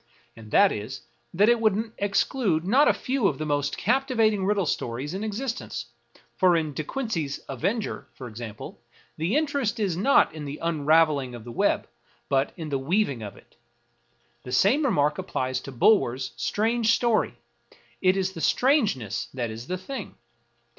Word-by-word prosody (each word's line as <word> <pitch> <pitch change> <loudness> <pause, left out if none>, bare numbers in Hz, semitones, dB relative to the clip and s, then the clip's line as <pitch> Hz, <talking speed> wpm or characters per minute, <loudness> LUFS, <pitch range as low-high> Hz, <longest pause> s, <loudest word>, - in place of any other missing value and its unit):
And 110 -1 -12
that 200 - +5
is, 105 +1 -5 0.3
that 200 +5 +3
it 240 0 +4
would 220 +1 +1
exclude 200 -3 +1
not 260 +10 +4
a - - +7
few 255 -5 0
of 140 - -1
the 155 - -3
most 145 -1 -1
captivating 225 -4 +1
riddle 200 -1 +1
stories 130 +1 -3
in 195 +3 -4
existence; 215 - -4 0.4
for 180 -2 +4
in 155 -3 -2
De 155 - -3
Quincey's 165 - -3
" - - -35
Avenger," 195 - -2
for 130 - -8
example, 110 -1 -8 0.4
the 165 - 0
interest 280 -8 0
is 195 -6 0
not 255 +11 +4
in 155 -2 -7
the 145 +1 -5
unraveling 155 -4 +2
of 120 - -9
the 120 - -8
web, - - +1 0.4
but 135 0 +1
in 160 -3 -5
the 140 -2 -1
weav 185 +11 +1
ing 125 -5 -6
of 105 -2 -8
it. - - -21 0.8
The 125 - -9
same 205 - +3
remark 150 - +1
applies 130 -8 -2
to 135 - -9
Bulwer's 130 - +2
" - - -31
Strange 220 - +1
Story 230 - +1 0.3
": - - -28
it 185 +1 +3
is 190 -1 0
the 165 - -7
strangeness 200 - +1
that 120 -3 -2
is 115 +3 -8
the 185 - -2
thing. 225 +4 -7
175 Hz, 175 wpm, -26 LUFS, 135-220 Hz, 0.8 s, a